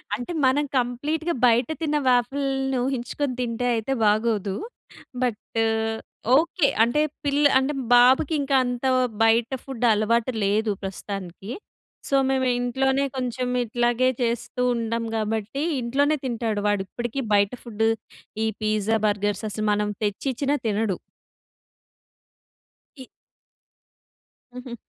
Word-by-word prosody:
అంటే 245 +9 -6
మనం 285 +3 +3
కంప్లీట్‌గా 300 +7 -1
బయట 235 +1 +3
తిన్న 300 -1 +1
వాఫిల్‌ని 270 +1 +1
ఊహించుకొని 260 +1 -2
తింటే 245 0 -2
అయితే 230 +4 -1
బాగోదు. 210 -2 +1 0.7
బట్టు 225 -1 -1 0.7
ఓకే. 325 -2 +2 0.2
అంటే 240 +6 +2 0.2
పిల్ల 285 +1 +2 0.2
అంటే 265 +3 -1 0.2
బాబుకి 260 +6 +5
ఇంకా 275 -1 0
అంత 245 +1 -3 0.4
బయట 225 +1 +3
ఫుడ్ 255 -3 -3
అలవాటు 230 +3 +1
లేదు 210 +2 +1
ప్రస్తుతానికి. 195 0 -6 0.6
సో 275 - +2
మేము 265 -1 +1
ఇంట్లోనే 265 +2 +1
కొంచెం 250 0 -2 0.2
ఇట్లాగే 240 +2 +1
చేస్తూ 240 +1 -2
ఉంటాం 230 0 -2
కాబట్టి, 220 +5 -2 0.2
ఇంట్లోనే 285 +6 +1
తింటాడు. 225 -4 -1
వాడు 205 -2 +1
ఇప్పటికి 240 +5 -4
బయట 200 0 +3
ఫుడ్ 225 -2 -1 0.6
ఈ - - +1
పిజ్జా, 215 +1 +1
బర్గర్స్ 205 0 -1
అసలు 215 +1 -3
మనం 210 0 0
తెచ్చిచ్చినా 270 +7 -1
తినడు. 210 -2 0 2.0
ఇ - - -7 1.5
హుహు. 250 -1 -7
240 Hz, 110 wpm, -24 LUFS, 215-265 Hz, 2.0 s, బాబుకి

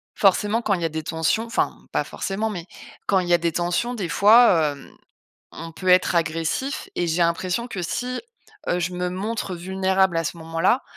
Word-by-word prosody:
Forcément 205 +3 +3
quand 210 - +1
il 175 - -1
y - - 0
a - - 0
des 160 0 -4
tensions 165 +8 0
enfin 235 - -1
pas - - 0
forcément, 210 +3 -3
mais 175 -5 -6 0.4
quand 195 - +3
il 180 - -3
y - - +4
a - - +6
des 170 0 -1
tensions, 175 +8 -1
des 190 -8 -4
fois, 200 -6 +5
hem, 140 - -14 0.6
on 165 - -8
peut 185 +3 -7
être 180 -1 +4
agressif 165 - -1
et 175 - 0
j'ai 165 +2 0
l'impression 180 +7 0
que 190 -6 -5
si, 250 +8 -3 0.5
heu, 175 - +1
je 175 +1 -1
me 180 0 -2
montre 195 0 -3
vulnérable 190 0 +1
à 165 - +1
ce 170 - -4
moment-là. 165 +9 0
180 Hz, 200 wpm, -23 LUFS, 165-210 Hz, 0.6 s, a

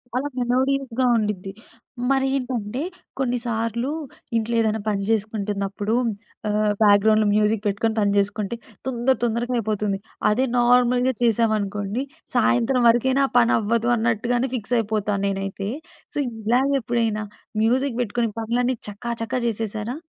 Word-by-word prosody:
అలా 265 +3 0
మెలోడీస్‌గా 260 0 +1
ఉండిద్ది. 210 -4 -1 0.6
మరేంటంటే 265 -4 0 0.4
కొన్నిసార్లు 235 -1 -1 0.5
ఇంట్లో 230 +1 -1
ఏదైనా 220 -1 +1
పని 205 -2 0
జేసుకుంటున్నప్పుడు 210 -1 -1 0.5
ఆహ్, 210 0 +2
బ్యాక్‌గ్రౌండ్‌లో 215 +1 +5
మ్యూజిక్ 210 0 +2
పెట్టుకొని 220 +2 0
పని 205 -1 +2
జేసుకుంటే 200 +2 0 0.3
తొందర 260 +1 +1
తొందరగా 240 +1 0
అయిపోతుంది. 210 -3 -1 0.3
అదే 240 +5 +2
నార్మల్‌గా 245 +1 +4
చేశామనుకోండి 215 -1 +1 0.3
సాయంత్రం 245 +1 +3
వరకైనా 260 +4 +3
పని 235 -1 +5
అవ్వదు 230 +2 0
అన్నట్టుగానే 235 +2 0
ఫిక్స్ 240 +1 -1
అయిపోతాను 210 -2 -1
నేనైతే. 195 0 -3 0.4
సో, - - -6 0.3
ఇలాగ 245 +5 +2
ఎప్పుడైనా 225 -2 0 0.4
మ్యూజిక్ 250 +2 +1
బెట్టుకుని 235 0 0
పనులన్నీ 245 +3 0
చక 235 +4 -4
చక 225 - -7
జేసేసారా? 225 +2 -2
225 Hz, 115 wpm, -23 LUFS, 210-245 Hz, 0.6 s, బ్యాక్‌గ్రౌండ్‌లో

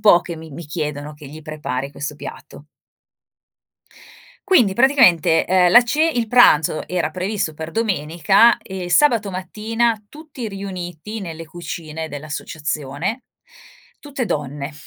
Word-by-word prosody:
po' 205 -5 +6
che 170 -2 -7
mi 160 0 -11
mi 165 +4 -8
chiedono 150 -1 -4
che 150 -1 -12
gli 155 +2 -11
prepari 145 -4 -4
questo 150 +1 -6
piatto. 145 - -10 1.8
Quindi 230 - +4
praticamente, 230 - +4
ehm, 180 -1 +4
la 240 +1 +8
ce 295 +6 +1
il 240 -7 -1
pranzo 160 -11 +4
era 175 -4 -1
previsto 185 -2 -2
per 160 +1 -7
domenica 195 +1 +3
e 190 -2 -7
il 175 - -6
sabato 230 -8 +3
mattina 215 +4 -1
tutti 295 -7 -8
riuniti 195 +1 -6
nelle 165 -3 -7
cucine 160 -1 -6
dell'associazione. 155 - -4 0.8
Tutte 275 -4 -4
donne, 145 -4 -4
175 Hz, 130 wpm, -20 LUFS, 155-220 Hz, 1.8 s, la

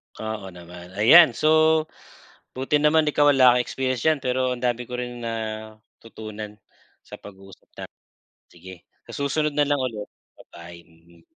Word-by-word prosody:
Oo 110 -2 -6
naman. 90 +1 -13
Ayan, 125 - +6
so, 155 0 +3 0.7
buti 135 +3 0
naman 150 +2 +3
ikaw 145 0 +3
wala 130 -2 +5
kang 125 - +1
experience 130 -1 -3
diyan 155 -2 +2
pero 130 0 -1
ang 120 - -12
dami 125 0 -1
ko 125 - -6
rin 120 -1 -6
natutunan 110 -1 -8 0.5
sa - - -12
pag-uusap 95 -1 -15
natin. - - -11 0.5
Sige, 90 +1 -14 0.2
sa - - -10
susunod 145 +1 -1
na 145 - +3
lang 145 -1 0
ulit. 115 -5 -5 0.3
Ba-bye. 85 0 -14
Mm. 85 0 -24
120 Hz, 150 wpm, -23 LUFS, 100-140 Hz, 0.7 s, Ayan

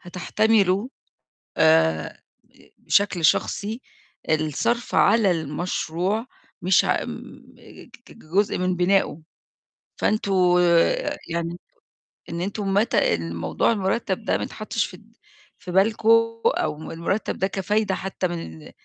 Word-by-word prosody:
هتحتملوا 200 +3 +1 0.7
آآ 80 0 +2 0.6
بشكل 195 -4 +1
شخصي 210 +8 +1 0.5
الصرف 155 - 0
على 220 -4 +4
المشروع، 175 - -2 0.4
مش 185 +1 +4
ع - - 0
م - - -6 0.7
ك - - -17
كجزء 200 -4 -2
من 185 0 0
بنائه، 180 -2 +1 0.8
فأنتم 215 -2 0 0.3
آآ 170 -1 +2
يعني 170 +1 -3 0.7
إن 170 +1 -5
أنتم 195 +1 -2
متى 205 - +2
الموضوع 85 - -1
المُرتَب 200 +1 -1
ده - - +1
ما - - -5
يتحطش - - -3
في - - -13 0.6
في 180 - -9
بالكم 215 +4 +2 0.4
أو 155 0 -1
المُرتَب 170 +6 -2
ده 190 - +1
كفايدة 195 +1 -1
حتى 190 -1 -3
من 80 - -8
185 Hz, 110 wpm, -23 LUFS, 160-205 Hz, 0.8 s, على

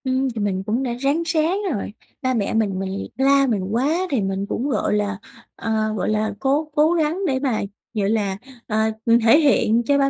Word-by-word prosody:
Ừm, 260 +1 +1
thì 220 - -2
mình 190 -2 -1
cũng 230 +6 0
đã 245 -2 -2
ráng 280 +5 +1
ráng 325 +2 +1 0.2
rồi. 205 -1 -4 0.3
Ba 255 -2 0
mẹ 215 -5 -1
mình 205 -4 0
mình 195 +1 -4
la 275 +1 +4
mình 210 -6 0
quá 265 +8 +1
thì 265 -6 +1
mình 195 0 -2
cũng, 265 +5 -2
gọi 260 - 0
là, 205 -2 0 0.4
ờ, 220 -1 -1
gọi - - -1
là, 215 0 0
cố 285 +3 0
cố 310 +3 +4
gắng 335 +3 0
để 260 -3 0
mà, 260 -5 0 0.3
gọi 205 -3 0
là, 205 -3 0 0.3
ờ, 215 - -1 0.5
thể 230 +7 +6
hiện 240 -6 +3
cho 285 +2 +3
ba 275 -1 +3
240 Hz, 210 wpm, -22 LUFS, 210-280 Hz, 0.5 s, thể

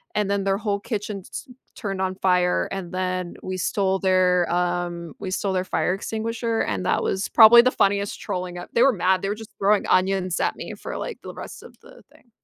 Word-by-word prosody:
and 210 -2 0
then 200 -1 0
their 195 0 +1
whole 205 -1 -2
kitchen 210 -2 -4
ts 285 - -8 0.3
turned 195 -4 -4
on 190 0 0
fire, 180 -1 +2
and 190 -3 -5
then 185 -1 -2
we 185 - -4
stole 190 +1 0
their, 185 -2 +2
um, 175 -2 -2
we 190 -2 -5
stole 190 +1 -1
their 185 -1 0
fire 180 -1 0
extinguisher 225 +3 -3
and 95 -2 -2
that - - +1
was 190 0 -1
probably 230 +1 +9
the 255 +1 +2
funniest 200 -2 0
trolling 180 -1 -4
ep 175 - -8
they 235 - +4
were 275 - +6
mad, 185 -2 +1
they 195 - -2
were, 205 - -1
just, 220 0 -11
throwing 200 +1 +2
onions 185 -1 +1
at - - 0
me - - -7
for, - - -7
like, - - -5
the - - -8
rest - - -9
of - - -13
the - - -16
thing. 240 - -24
190 Hz, 215 wpm, -23 LUFS, 180-205 Hz, 0.3 s, probably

